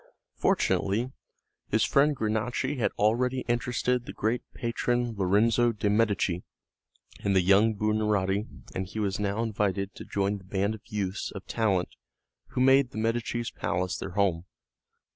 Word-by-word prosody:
Fortunately 110 +6 +1 0.6
his 110 +1 +2
friend 145 +2 +3
Granacci 120 +5 -1
had 115 - +1
already 125 +5 +1
interested 120 +1 0
the - - -6
great 115 +3 0
patron, 120 0 -1
Lorenzo 110 +5 +3
de' 105 -1 0
Medici, 105 -5 +1 0.8
in 100 - 0
the 95 - +5
young 100 +4 +4
Buonarotti 105 -1 +1 0.3
and 95 0 -3
he 110 - -9
was 100 -2 -1
now 105 +2 0
invited 100 -3 -1
to - - -9
join 100 0 -1
the - - -17
band 100 +2 -1
of 110 - -9
youths 100 -2 -3
of 100 - -9
talent 100 -6 0 0.6
who 125 - -2
made 135 0 +5
the - - -10
Medici's 115 +1 -1
palace 90 0 -2
their 95 - -6
home. 90 -4 +1
105 Hz, 145 wpm, -28 LUFS, 100-120 Hz, 0.8 s, the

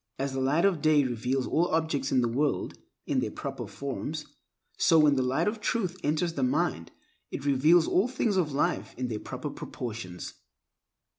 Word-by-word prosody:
As 135 0 -2
the 135 - -1
light 150 +7 +2
of 185 -6 +2
day 155 -1 +4
reveals 125 +1 -1
all 170 +2 +2
objects 160 -5 0
in 130 - +4
the 120 - +2
world 140 +5 0 0.3
in - - +1
their - - -1
proper - - -6
forms, 140 +3 -5 0.5
so 165 - +4
when 150 -2 +6
the 130 - +2
Light 130 +8 +1
of 215 +1 -2
Truth 200 -5 -1
enters 155 +3 0
the 140 - -3
mind 130 - 0 0.4
it 140 - -6
reveals 155 +5 +4
all 190 +6 +3
the 255 - -10
things 215 -5 +1
of 170 -5 +1
life 160 +6 -1
in 125 -1 -2
their 110 -2 -3
proper - - -6
proportions. 105 -7 -6
145 Hz, 190 wpm, -28 LUFS, 130-170 Hz, 0.5 s, when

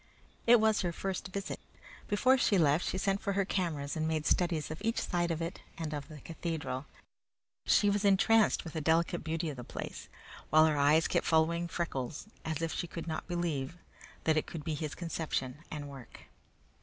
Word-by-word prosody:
It 240 0 +8
was 220 -1 +3
her 175 -3 0
first 190 +3 -3
visit. 195 +1 -4 0.5
Before 255 +6 +4
she 225 -6 +3
left 155 0 +3
she - - -1
sent 195 +1 0
for 200 - -1
her 195 0 +1
cameras 155 -8 -1
and 160 0 0
made 155 -1 -1
studies 170 -4 +1
of 155 - -6
each 225 +1 0
side 175 -1 0
of 165 0 -1
it 170 +3 -4 0.2
and 155 -2 -3
of 145 -2 -4
the 150 -3 -11
cathedral. 160 -5 -4 0.8
She 205 - +5
was 205 0 +2
entranced 205 +2 +4
with 165 -4 -8
the 160 - -2
delicate 165 +3 +2
beauty 160 0 -2
of 140 - -9
the 125 - -6
place, - - -7 0.4
while 155 +1 +7
her 155 -1 +2
eyes 145 +3 +4
kept - - 0
following 170 +1 +3
Freckles 155 -5 -3 0.2
as 160 0 -2
if 165 - -1
she 175 - -3
could 165 0 -6
not 160 -2 -4
believe 170 -4 -2 0.5
that 160 -1 +3
it 155 - 0
could 160 -3 -6
be 155 - -2
his 150 0 -4
conception 155 -6 -3
and 145 -2 -5
work. 135 -3 -11
165 Hz, 195 wpm, -32 LUFS, 155-185 Hz, 0.8 s, It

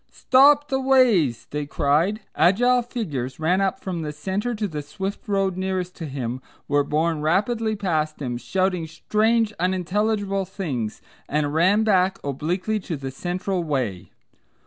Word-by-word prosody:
"Stop 285 +3 +4
the 265 - +1
Ways," 240 - +3
they 150 0 -3
cried. 160 +10 +1
Agile 245 +7 +4
figures 155 - -4
ran 180 +5 +2
up 195 -1 0
from 180 -3 -4
the 150 -1 -3
centre 195 +10 -3
to 210 -1 -2
the 150 -5 -5
swift 195 +7 -6
road 195 -2 +1
nearest 185 -1 -2
to 165 - -5
him, 130 -2 -4 0.3
were 145 0 +2
borne 155 +2 0
rapidly 215 +7 +1
past 160 -6 -1
him, 125 -4 -3
shouting 180 +6 -1
strange, 215 +7 +1
unintelligible 195 +2 0
things, 140 - -4 0.3
and 145 0 0
ran 185 +7 +4
back 190 -3 +3
obliquely 175 +10 -1
to 170 -5 -5
the 135 -1 -5
central 180 +5 -2
way. 125 - -2
185 Hz, 145 wpm, -23 LUFS, 150-210 Hz, 0.3 s, Stop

